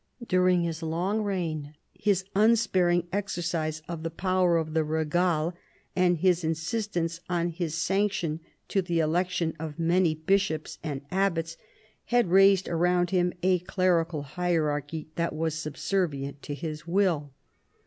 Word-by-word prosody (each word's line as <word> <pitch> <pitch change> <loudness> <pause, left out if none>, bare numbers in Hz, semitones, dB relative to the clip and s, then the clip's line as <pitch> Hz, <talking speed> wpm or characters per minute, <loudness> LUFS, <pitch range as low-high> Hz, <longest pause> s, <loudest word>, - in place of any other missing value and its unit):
During 180 -1 +3
his 165 -1 -3
long 175 +7 -1
reign 160 -7 -3 0.2
his 195 -3 0
unsparing 190 -6 +3
exercise 170 -5 -2
of 170 -2 -5
the 165 - -3
power 180 0 +2
of 160 -1 -2
the 160 -1 +2
regale, 160 +2 0 0.4
and 180 -1 +3
his 180 0 +2
insistence 165 +1 -2
on 175 -1 0
his 165 -2 -3
sanction 190 -2 0 0.3
to 195 - +2
the 175 -2 -1
election 165 +1 0
of 155 -1 -6
many 170 0 +2
bishops 160 -1 0
and 145 -4 -4
abbats, 170 -4 0 0.5
had 240 -7 +2
raised 195 0 +6
around 175 +1 +1
him 180 -1 +2
a 185 -1 +3
clerical 175 -4 0
hierarchy 155 -1 -1
that 170 -2 -1
was 160 0 -1
subservient 155 -2 -2
to 145 - -5
his 155 +2 -6
will. 170 -6 +1
170 Hz, 135 wpm, -27 LUFS, 160-185 Hz, 0.5 s, raised